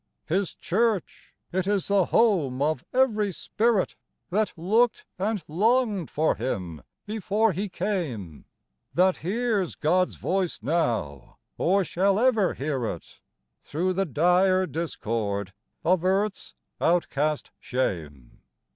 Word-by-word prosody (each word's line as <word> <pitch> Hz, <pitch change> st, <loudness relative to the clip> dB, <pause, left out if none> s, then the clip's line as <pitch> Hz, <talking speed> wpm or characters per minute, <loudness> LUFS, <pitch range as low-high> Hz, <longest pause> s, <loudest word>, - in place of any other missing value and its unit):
His 185 Hz, +3 st, -1 dB
Church, 215 Hz, -1 st, -1 dB
— -, -, -48 dB
it 185 Hz, 0 st, 0 dB
is 200 Hz, -2 st, +1 dB
the 200 Hz, -2 st, +3 dB
home 165 Hz, -, +2 dB
of 145 Hz, -2 st, 0 dB
every 220 Hz, -6 st, +2 dB
spirit 215 Hz, +3 st, 0 dB, 0.4 s
That 210 Hz, +3 st, +1 dB
looked 220 Hz, +8 st, +2 dB
and 205 Hz, -1 st, -1 dB
longed 210 Hz, +2 st, +1 dB
for 155 Hz, +2 st, +2 dB
Him 90 Hz, -, -4 dB, 0.2 s
before 215 Hz, +1 st, +1 dB
He 195 Hz, +4 st, -3 dB
came; 160 Hz, -, -3 dB, 0.5 s
That 185 Hz, +1 st, +4 dB
hears 205 Hz, 0 st, -1 dB
God's 180 Hz, +4 st, +1 dB
voice 185 Hz, -2 st, -1 dB
now, 115 Hz, -, -1 dB, 0.2 s
or 195 Hz, +3 st, +2 dB
shall 190 Hz, +3 st, +1 dB
ever 225 Hz, -5 st, +3 dB
hear 135 Hz, -4 st, -2 dB
it, 85 Hz, -, -7 dB, 0.4 s
Through 180 Hz, +5 st, -1 dB
the 195 Hz, +1 st, 0 dB
dire 180 Hz, +5 st, +3 dB
discord 110 Hz, -, -3 dB, 0.3 s
of 180 Hz, 0 st, +2 dB
earth's 195 Hz, +2 st, 0 dB, 0.3 s
outcast 155 Hz, -3 st, +1 dB
shame. 75 Hz, -, -4 dB
180 Hz, 120 wpm, -26 LUFS, 145-205 Hz, 0.5 s, That